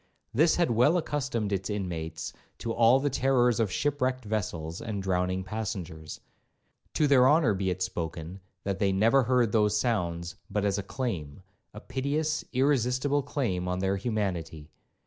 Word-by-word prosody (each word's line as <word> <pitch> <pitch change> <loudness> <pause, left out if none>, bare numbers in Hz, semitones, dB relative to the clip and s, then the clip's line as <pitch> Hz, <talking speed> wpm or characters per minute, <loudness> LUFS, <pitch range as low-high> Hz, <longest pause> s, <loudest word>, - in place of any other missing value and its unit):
This 160 +7 +4
had 175 -7 +2
well 125 +9 +4
accustomed 130 - -2
its 95 +1 -2
inmates 85 -5 -4 0.2
to 115 - -3
all 120 +3 +5
the 145 +1 0
terrors 125 -3 +2
of 110 -4 +1
shipwrecked 130 -3 -1
vessels 85 -6 -3
and 105 -4 -4
drowning 90 0 0
passengers. 95 -6 -5 0.7
To 155 - +3
their 130 -3 +6
honour 150 -7 +4
be 95 -1 -1
it 90 0 -1
spoken, 85 0 -5 0.2
they 100 0 0
never 115 +8 +4
heard 125 -3 +2
those 105 -1 +3
sounds 85 -7 -1
but 105 -1 -1
as 100 0 +1
a - - -1
claim, 95 - -4 0.3
a 105 - -9
piteous, 140 +6 -1
irresistible 135 +1 +2
claim 115 -11 -2
on 90 0 -1
their 95 +1 0
humanity. 90 -8 -3
105 Hz, 150 wpm, -28 LUFS, 90-130 Hz, 0.7 s, their